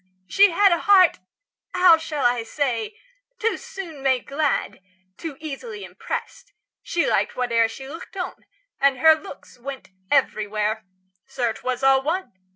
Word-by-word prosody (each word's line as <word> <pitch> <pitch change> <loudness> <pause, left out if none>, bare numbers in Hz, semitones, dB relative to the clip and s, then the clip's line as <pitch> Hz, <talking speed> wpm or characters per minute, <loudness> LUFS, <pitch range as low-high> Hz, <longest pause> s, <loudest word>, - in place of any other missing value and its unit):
She 400 - +5
had 395 +3 +4
A 340 - +2
heart 375 - +5 0.6
how 360 -3 +6
shall 300 -4 -3
I 245 -1 +3
say? 250 - -2 0.4
too 455 +2 0
soon 390 - -9
made 260 -2 +1
glad, 280 -7 -1 0.3
Too 320 -5 -7
easily 400 - -7
impressed; - - -7 0.3
she 340 - -1
liked - - +1
whate'er 235 -2 +2
She 265 +4 -9
looked 330 +6 -10
on, 360 - -5 0.3
and 275 -1 +3
her 320 +5 +7
looks 315 -5 -10
went 270 -1 -8 0.2
everywhere. 215 -5 0 0.4
Sir, 250 -4 -1
'twas 255 +3 -4
all 270 0 +5
one! 330 - -2
280 Hz, 145 wpm, -23 LUFS, 250-345 Hz, 0.6 s, her